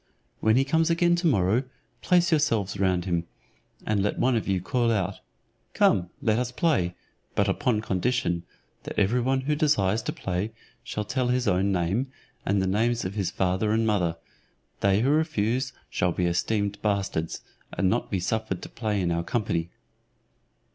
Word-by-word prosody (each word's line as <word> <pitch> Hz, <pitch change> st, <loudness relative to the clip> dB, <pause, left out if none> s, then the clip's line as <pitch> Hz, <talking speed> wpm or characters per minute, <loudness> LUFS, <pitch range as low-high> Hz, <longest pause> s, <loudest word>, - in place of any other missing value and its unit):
When 110 Hz, 0 st, +3 dB
he 135 Hz, +2 st, +3 dB
comes 160 Hz, +4 st, +2 dB
again 175 Hz, +1 st, +3 dB
to 175 Hz, 0 st, +1 dB
morrow, 100 Hz, -, +3 dB, 0.4 s
place 175 Hz, -1 st, +3 dB
yourselves 115 Hz, -, +1 dB
round 90 Hz, -2 st, +1 dB
him, 85 Hz, -2 st, -1 dB, 0.6 s
and 105 Hz, -2 st, +1 dB
let 105 Hz, -, 0 dB
one 130 Hz, -1 st, +2 dB
of 115 Hz, -, -1 dB
you 95 Hz, -2 st, +1 dB
call 115 Hz, +6 st, +1 dB
out, 100 Hz, -3 st, -1 dB, 0.6 s
"Come, 90 Hz, -1 st, +3 dB
let 110 Hz, 0 st, +2 dB
us 125 Hz, 0 st, -2 dB
play, 125 Hz, -, +1 dB, 0.4 s
but -, -, +2 dB
upon 110 Hz, -4 st, +1 dB
condition, 95 Hz, -3 st, 0 dB, 0.4 s
that -, -, -8 dB
every 110 Hz, +5 st, +2 dB
one 130 Hz, +2 st, +1 dB
who 145 Hz, +3 st, 0 dB
desires 115 Hz, -9 st, +2 dB
to -, -, -3 dB
play 95 Hz, +4 st, -3 dB, 0.3 s
shall 105 Hz, -3 st, -4 dB
tell 125 Hz, +3 st, -1 dB
his 125 Hz, -1 st, +1 dB
own 95 Hz, +1 st, +2 dB
name, 95 Hz, +8 st, 0 dB, 0.4 s
and 100 Hz, +1 st, +2 dB
the 95 Hz, -, +1 dB
names 115 Hz, +4 st, +1 dB
of 95 Hz, -, -3 dB
his 100 Hz, -3 st, -1 dB
father 95 Hz, +3 st, 0 dB
and 110 Hz, +1 st, +2 dB
mother; 90 Hz, -6 st, +1 dB, 0.6 s
they 100 Hz, +1 st, +3 dB
who 130 Hz, -, +2 dB
refuse 130 Hz, -5 st, +1 dB, 0.2 s
shall 90 Hz, -, 0 dB
be 90 Hz, +1 st, -1 dB
esteemed 100 Hz, +4 st, 0 dB
bastards, 100 Hz, -6 st, -1 dB, 0.3 s
and 95 Hz, -, 0 dB
not 115 Hz, +6 st, 0 dB
be 95 Hz, -, -1 dB
suffered 110 Hz, 0 st, -2 dB
to -, -, -7 dB
play 110 Hz, -3 st, -2 dB
in 90 Hz, -2 st, 0 dB
our 85 Hz, 0 st, 0 dB
company." 85 Hz, -4 st, -1 dB
105 Hz, 175 wpm, -26 LUFS, 95-125 Hz, 0.6 s, When